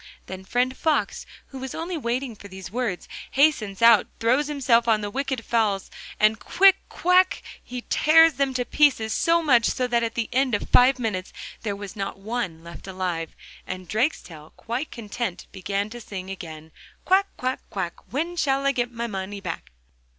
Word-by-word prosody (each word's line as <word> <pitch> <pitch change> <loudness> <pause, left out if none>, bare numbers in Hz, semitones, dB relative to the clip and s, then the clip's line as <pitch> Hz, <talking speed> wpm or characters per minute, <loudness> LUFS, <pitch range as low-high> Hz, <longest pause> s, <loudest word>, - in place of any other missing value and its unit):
Then 190 0 -8
friend 250 +5 0
Fox, 315 -1 0 0.2
who 270 - -8
was 265 0 -6
only 340 +2 -4
waiting 250 -3 -2
for 200 - -12
these 190 -3 -9
words, 230 -6 -3 0.2
hastens 240 -8 +2
out, 230 -2 +7
throws 255 +6 +2
himself 255 -5 +2
on 220 -2 +3
the 205 0 -4
wicked 265 -2 -3
fowls, 215 -5 0 0.3
and 215 0 +4
quick! 390 0 +5
quack! 365 +1 +3 0.2
he 250 0 -7
tears 325 +1 +6
them 275 0 -1
to 250 -1 0
pieces; 255 -8 +3
so 335 0 +2
much 245 -6 +4
so 255 - 0
that 240 -1 +1
at 230 -1 -2
the 230 -1 -1
end 260 -2 +2
of - - -4
five 255 +1 +6
minutes 210 -7 -3 0.3
there 205 -2 -2
was 200 -1 -8
not 195 -2 -4
one 195 -6 -4
left 170 +3 -11
alive. 180 -3 -3 0.3
And 185 -1 -6
Drakestail, 175 - -2
quite 245 +6 -4
content, 215 -4 -5
began 200 +1 -2
to 240 0 -8
sing 190 -3 -7
again, 160 -4 -9 0.3
'Quack, 390 +1 +4
quack, 255 +1 -2
quack, 190 -4 -3 0.2
when 330 +6 -2
shall 275 -4 +1
I 275 - +4
get 245 -2 -1
my 235 0 -4
money 200 -2 -5
back? 180 -4 -6
235 Hz, 180 wpm, -24 LUFS, 195-270 Hz, 0.3 s, out